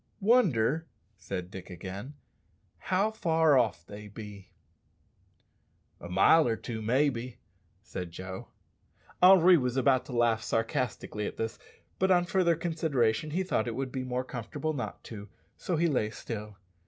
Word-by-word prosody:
"Wonder," 165 - +3 0.3
said 90 -1 -6
Dick 95 0 -9
again, 95 - -7 0.6
"how 195 +4 +1
far 160 -8 +3
off 105 -10 +1
they 105 +2 -10
be." 105 -2 -10 1.5
"A 85 - -9
mile 125 - +5
or 115 - +1
two, 110 -1 -6
maybe," 125 +1 0 0.5
said 90 -5 -6
Joe. 95 +2 -8 0.7
Henri 180 -1 +8
was 125 -2 -1
about 130 -1 +3
to 130 - -8
laugh 115 -2 +3
sarcastically 115 -2 -2
at - - -7
this, 115 0 -3 0.4
but 190 - +2
on 175 -1 +4
further 175 -2 +2
consideration 155 -6 0
he 180 +5 -1
thought 120 -11 -1
it 115 - -3
would 130 -1 -3
be 130 -1 -3
more 125 0 -2
comfortable 130 +5 -4
not 130 -4 -5
to, 105 -2 -9 0.3
so 180 - -2
he 170 - +2
lay 130 -9 +1
still. 105 -2 -7
125 Hz, 145 wpm, -29 LUFS, 105-160 Hz, 1.5 s, Henri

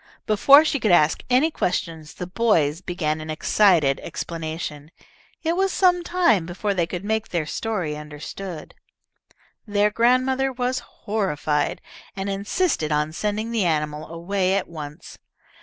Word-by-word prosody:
Before 275 +8 +6
she 285 - 0
could 220 - +1
ask 160 -3 +4
any 265 +6 +3
questions, 165 - -3
the 180 - -5
boys 180 -6 +1
began 160 -4 -2
an 155 - -8
excited 155 -3 +3
explanation. 155 -3 -5 0.5
It 330 +1 +1
was 385 +1 +1
some 355 -2 +3
time 340 - +2
before 200 +3 -2
they 175 -3 0
could 180 +2 -5
make 220 +1 -1
their 170 -3 -1
story 180 -3 -3
understood. 150 +3 -8 0.9
Their 205 0 +2
grandmother 255 +4 +2
was 250 0 -1
horrified, 185 -11 -2 0.3
and 195 0 -3
insisted 200 - -1
on 150 +1 0
sending 210 +5 -2
the 225 -3 +1
animal 150 -2 -1
away 185 +3 -1
at 200 - -1
once. 150 -3 -9
190 Hz, 140 wpm, -23 LUFS, 155-230 Hz, 0.9 s, Before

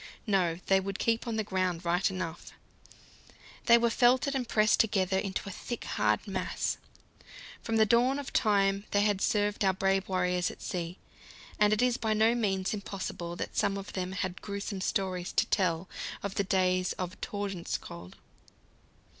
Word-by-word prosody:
No, 185 -6 +1
they 195 0 +4
would 195 0 -4
keep 230 +1 0
on 230 - -1
the 220 - 0
ground 185 -3 -1
right 175 +4 +2
enough; 185 -3 -5 1.1
they 235 -1 +8
were 235 0 +2
felted 255 +3 +3
and 250 -4 -2
pressed 215 -1 +3
together 190 -3 +2
into 195 0 -3
a - - -4
thick, 240 +5 -6
hard - - 0
mass. - - -2 0.8
From 225 - -2
the 220 - +6
dawn 240 +5 +3
of 285 -2 -6
time 200 -2 +2
they 205 - +2
had 205 -2 +1
served 205 -1 +1
our 190 -1 +4
brave 195 0 0
warriors 180 -1 +1
at - - -11
sea, 175 0 -4 0.6
and 210 0 +5
it 215 +3 +2
is 250 -1 +2
by 220 -3 0
no 220 +2 +4
means 195 -5 0
impossible 190 -4 -5
that - - -5
some 200 -1 +1
of 195 0 -7
them 185 0 -3
had 185 -1 -3
gruesome 200 -1 -4
stories 185 -3 -1
to - - +3
tell 180 -3 0 0.4
of 200 -1 -3
the 200 - 0
days 185 -1 +1
of 185 0 -6
Tordenskjold. 180 - -5
195 Hz, 170 wpm, -30 LUFS, 185-215 Hz, 1.1 s, they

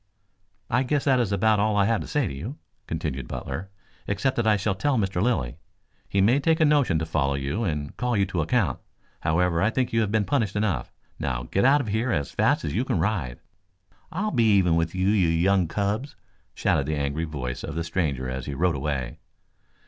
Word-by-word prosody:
"I 120 - +2
guess 140 +2 0
that 135 -3 +3
is 115 -5 0
about 105 +2 +3
all 105 0 +2
I 100 - +4
have 115 +1 +1
to - - -7
say 145 -4 0
to 90 - -4
you," 105 - -6 0.3
continued 75 -6 -3
Butler. 95 +9 -5 0.4
"Except 105 +7 0
that 120 -2 +1
I 105 -1 +4
shall 100 +1 0
tell 130 +8 0
Mr. 95 -4 0
Lilly. 80 - 0 0.5
He 100 - +2
may 120 +8 +4
take 160 +3 +2
a 160 - +5
notion 145 - +3
to 80 - -1
follow 70 -4 0
you 70 +11 -2
and 75 -7 -3
call 125 -2 0
you 100 - +3
to 95 -3 -2
account. 105 +4 +1 0.4
However, 85 +1 +1
I 105 - +3
think 125 +1 -1
you 115 - +3
have 105 -2 0
been 110 -1 +2
punished 110 -8 0
enough. 100 - -1 0.3
Now 60 -2 -2
get 95 - 0
out 140 +2 +5
of 115 - -5
here 110 +4 0
as 75 -7 -1
fast - - +1
as 70 - -3
you 115 +7 +1
can 130 - -1
ride." 80 - -1 0.7
"I'll 200 +6 -1
be 115 -6 +3
even 90 -4 +3
with 85 +1 0
you, 95 0 +1
you 100 -5 +3
young 90 +2 +2
cubs!" 105 - -2 0.4
shouted 70 - +1
the 80 - 0
angry 70 +3 -1
voice 70 -6 -5
of 80 - -5
the 85 - -1
stranger 80 -7 -1
as 65 +1 -5
he 70 - -4
rode 85 +1 +1
away. 70 -3 -3
95 Hz, 215 wpm, -25 LUFS, 80-115 Hz, 0.7 s, a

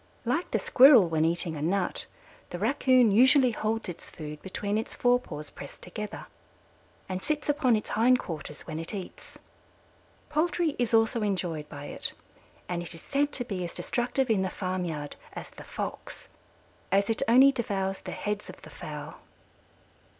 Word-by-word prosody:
Like 305 +9 0
the - - +1
Squirrel 255 - +7
when 160 -1 +1
eating 170 0 0
a 145 - -5
nut, 180 +4 -1 0.4
the 175 - -5
Raccoon 250 +2 +4
usually 255 +4 +6
holds 225 +1 -2
its 175 -2 -8
food 150 -2 -8
between 200 +2 -3
its 220 - -3
fore 245 0 +3
paws 150 -11 -8
pressed 140 - -10
together 210 +4 -6 0.8
and 185 0 -3
sits 300 +6 -2
upon 285 -5 +3
its 215 - -3
hind 245 +4 +4
quarters 155 -7 -7
when 155 -1 -6
it 165 +5 -4
eats. 190 -2 -9 0.9
Poultry 315 0 +1
is 240 -2 +2
also 225 +1 +3
enjoyed 175 -7 -2
by 145 - -8
it, - - -3 0.5
and 175 -1 -2
it 175 0 -6
is 165 - -11
said 285 +1 0
to 245 - 0
be 195 -6 -3
as 170 - -6
destructive 245 +1 0
in 205 -3 +3
the 190 - 0
farm 185 -1 -3
yard 150 -3 -5 0.2
as - - -8
the - - -11
Fox, - - -6 0.6
as 200 +1 +3
it 225 - 0
only 260 +4 +7
devours 195 -6 -2
the - - -8
heads 210 0 -3
of - - -11
the - - -11
fowl. - - -8
205 Hz, 170 wpm, -28 LUFS, 175-245 Hz, 0.9 s, Squirrel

